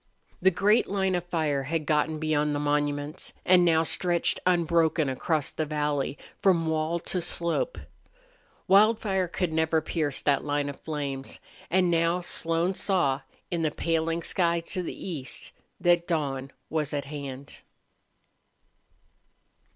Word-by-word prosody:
The 190 - +6
great 205 +5 +3
line 190 -1 0
of 175 -1 -1
fire 155 -5 0
had 155 +3 -2
gotten 155 +1 +1
beyond 150 -1 0
the - - -1
monuments 145 +1 -1
and 180 -1 +6
now 165 -2 +4
stretched 175 +1 +1
unbroken 165 -3 +2
across 145 +3 -1
the 155 - -2
valley 150 -2 -1 0.2
from 175 -4 +3
wall 160 +1 0
to 180 - -2
slope. 170 - 0 0.9
Wildfire 200 -2 +4
could 175 -1 -2
never 160 0 +2
pierce 155 -3 -2
that 140 -2 +2
line 145 -1 -1
of 140 - -8
flames. 140 -4 -3 0.3
And 180 0 +3
now 165 +1 +2
Slone 170 +1 +1
saw, 170 -9 +1 0.3
in 170 -2 -1
the 155 - +2
paling 165 +1 -1
sky 170 -1 +1
to 185 +3 -3
the 180 - -6
east, 145 -8 -4 0.3
that 175 -1 +3
dawn 140 -5 -2 0.2
was 150 -2 -2
at 140 -1 -2
hand. 140 -1 -7
160 Hz, 135 wpm, -27 LUFS, 145-175 Hz, 0.9 s, The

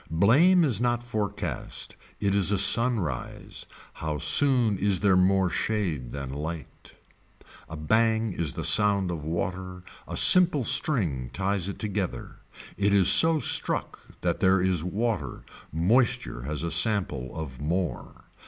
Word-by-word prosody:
Blame 145 - +3
is 120 -8 0
not 120 -1 -1
forecast 110 -4 -5 0.2
it 100 -1 -1
is 100 0 +3
a 100 - +1
sunrise, 100 - 0 0.3
how 75 -1 -5
soon 110 - +2
is 100 -2 0
there 100 -3 +3
more 95 +1 +2
shade 85 - -3
than 70 -2 -7
light. 75 -1 -8 0.7
A 80 - -8
bang 110 +5 0
is 80 -5 -1
the - - -6
sound 100 -3 +3
of 80 -3 -6
water, 90 +3 -5 0.2
a - - -5
simple 175 -7 +6
string 110 - 0
ties 95 0 -2
it 100 - -7
together. 100 -3 -5 0.4
It 100 0 +1
is 95 -1 +5
so 160 +7 +5
struck - - -1 0.2
that - - -2
there 95 0 +2
is 90 -3 -1
water, 100 - -4 0.3
moisture 95 - 0
has 75 +2 -4
a 85 - -3
sample 80 - 0
of 70 -5 -8
more. 85 +4 -5
95 Hz, 140 wpm, -25 LUFS, 80-110 Hz, 0.7 s, simple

